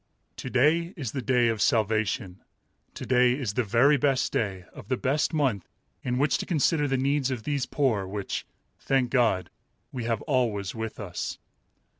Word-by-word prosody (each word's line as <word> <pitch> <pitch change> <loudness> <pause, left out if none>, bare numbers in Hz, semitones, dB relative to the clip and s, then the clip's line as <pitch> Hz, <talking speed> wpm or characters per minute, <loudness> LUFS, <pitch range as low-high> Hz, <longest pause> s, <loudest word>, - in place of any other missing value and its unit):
"To - - -5
day 160 +8 +2
is 130 -8 -4
the 135 - -3
day 125 -1 +2
of 110 -2 -1
salvation." 110 -4 +1 0.6
To - - -6
day 125 -1 +4
is 125 -6 -3
the 125 - +1
very 120 +8 +4
best 135 -1 +1
day 95 -4 -2
of - - -11
the 130 - 0
best 140 +5 0
month 130 - 0 0.3
in 125 -1 -2
which 140 +1 +2
to - - -5
consider 155 -2 +2
the 135 -1 0
needs 135 0 +1
of 125 -4 -4
these 140 -2 -1
poor 115 -10 0
which, 100 0 -4 0.4
thank 130 -3 +1
God, 115 -8 +2 0.4
"we 120 -3 -4
have 115 -2 -1
always 115 -9 0
with 110 -1 -5
us." 90 -5 -5
125 Hz, 175 wpm, -27 LUFS, 110-135 Hz, 0.6 s, day